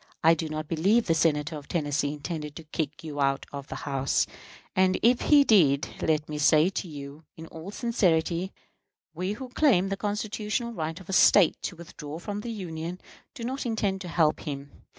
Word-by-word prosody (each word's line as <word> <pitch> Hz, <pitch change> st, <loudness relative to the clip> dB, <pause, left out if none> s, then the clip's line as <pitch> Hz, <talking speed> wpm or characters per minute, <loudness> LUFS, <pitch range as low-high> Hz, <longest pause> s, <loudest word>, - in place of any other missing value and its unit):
I 165 Hz, +1 st, +7 dB
do 160 Hz, -1 st, -3 dB
not 155 Hz, 0 st, -4 dB
believe 195 Hz, +9 st, +2 dB
the 165 Hz, -, +2 dB
Senator 155 Hz, -1 st, +1 dB
from 140 Hz, -, -20 dB
Tennessee 145 Hz, -3 st, 0 dB
intended 150 Hz, 0 st, -5 dB
to 165 Hz, -, -8 dB
kick 155 Hz, 0 st, -4 dB
you 145 Hz, -2 st, -4 dB
out 135 Hz, 0 st, +1 dB
of 140 Hz, 0 st, -6 dB
the -, -, -6 dB
House; 135 Hz, -2 st, +1 dB, 0.5 s
and, 185 Hz, 0 st, +3 dB
if 240 Hz, +2 st, +4 dB
he 290 Hz, -1 st, +6 dB
did, 155 Hz, -, +4 dB
let 155 Hz, -1 st, +1 dB
me 150 Hz, -1 st, -4 dB
say 155 Hz, +3 st, +5 dB
to 190 Hz, -1 st, -4 dB
you, 145 Hz, 0 st, -9 dB
in 160 Hz, -, -8 dB
all 165 Hz, +3 st, -9 dB
sincerity, 185 Hz, -6 st, +1 dB, 0.6 s
we 185 Hz, +4 st, -2 dB
who 255 Hz, +4 st, -8 dB
claim 240 Hz, -9 st, +3 dB
the 195 Hz, -, -2 dB
constitutional 210 Hz, +3 st, -2 dB
right 160 Hz, -4 st, -4 dB
of 185 Hz, -, -14 dB
a 195 Hz, -, -4 dB
State 190 Hz, -2 st, +5 dB
to -, -, -4 dB
withdraw 160 Hz, -3 st, -8 dB
from 200 Hz, +4 st, -5 dB
the 235 Hz, -, -5 dB
Union 175 Hz, -4 st, -5 dB, 0.4 s
do 235 Hz, -, -7 dB
not 260 Hz, +3 st, -3 dB
intend 205 Hz, -5 st, -1 dB
to 180 Hz, -, -6 dB
help 160 Hz, -3 st, +2 dB
him. 140 Hz, -1 st, -6 dB
165 Hz, 190 wpm, -27 LUFS, 150-200 Hz, 0.6 s, I